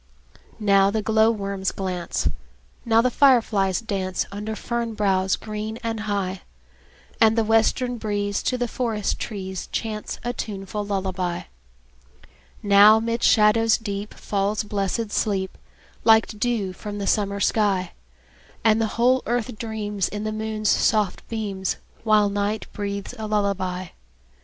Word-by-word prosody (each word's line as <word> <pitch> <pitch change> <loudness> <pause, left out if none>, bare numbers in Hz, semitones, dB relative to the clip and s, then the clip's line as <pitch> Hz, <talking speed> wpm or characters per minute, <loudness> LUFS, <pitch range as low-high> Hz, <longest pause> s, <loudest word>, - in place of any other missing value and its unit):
Now 200 -2 +4
the 215 +1 -1
glowworms 210 -3 +1
glance, 180 - -2 0.6
Now 225 -1 +4
the 255 - +2
fireflies 225 -8 +3
dance, 190 -4 -2
Under 210 +2 -4
fern 235 -1 -3
boughs 190 -2 +2
green 215 +1 -5
and 225 -1 -2
high; 200 -3 -2 0.8
And 225 0 +5
the 225 - +4
western 225 +3 +2
breeze 205 -1 -1
To 255 - 0
the 245 0 -1
forest 225 -4 -2
trees 190 -4 -5
Chants 215 -2 -4
a 240 0 -2
tuneful 205 -2 -4
lullaby. 185 -3 -2 1.2
Now 205 +2 +7
'mid 230 +1 -2
shadows 225 +1 +4
deep 205 -2 -5
Falls 205 +1 -1
blessed 205 +1 -2
sleep, 195 -3 -1 0.5
Like 220 0 +6
dew 215 -3 -1
from 205 +2 -7
the 200 - -3
summer 200 0 0
sky; 200 -4 +1 0.7
And 220 0 +4
the 225 - +2
whole 255 +2 +4
earth 240 0 -1
dreams, 210 -4 -2
In 210 +1 -5
the 215 - -2
moon's 215 0 -2
soft 210 -4 +1
beams, 200 -4 -2 0.3
While 215 -2 +4
night 205 +1 -1
breathes 200 +1 -4
a 215 - -3
lullaby. 190 -4 -1
210 Hz, 135 wpm, -23 LUFS, 200-225 Hz, 1.2 s, Now